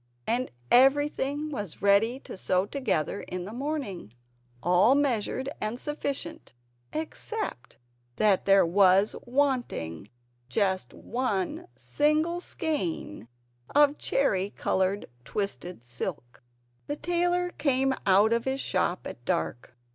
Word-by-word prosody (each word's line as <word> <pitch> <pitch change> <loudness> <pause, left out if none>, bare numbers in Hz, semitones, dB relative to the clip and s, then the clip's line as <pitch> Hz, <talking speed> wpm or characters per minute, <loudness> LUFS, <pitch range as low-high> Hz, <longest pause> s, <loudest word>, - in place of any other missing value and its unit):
And 245 +3 0 0.2
everything 290 +2 +3
was 205 - -5
ready 215 +6 +4
to - - -9
sew 185 0 +1
together 205 - -1
in 180 -1 -4
the 210 - -7
morning, 260 - -4 0.5
all 180 +9 +5
measured 260 -2 0
and 215 +3 -2
sufficient 280 - -4 0.4
except 320 - -5 0.4
that 205 +1 +3
there 195 -1 +6
was 190 +3 +4
wanting 240 - -1 0.4
just 190 +7 0
one 255 - -2
single 310 +4 +1
skein 185 - -3 0.5
of 290 0 +5
cherry 195 -8 +1
coloured 190 0 0 0.2
twisted 180 - -4
silk. 120 0 -6 0.5
The 290 - -2
tailor 350 +3 0
came 270 -3 +1
out 200 +4 +5
of 235 0 0
his 265 0 -1
shop 185 -6 -1
at 120 - -8
dark. 120 +6 -2
230 Hz, 110 wpm, -28 LUFS, 185-285 Hz, 0.5 s, there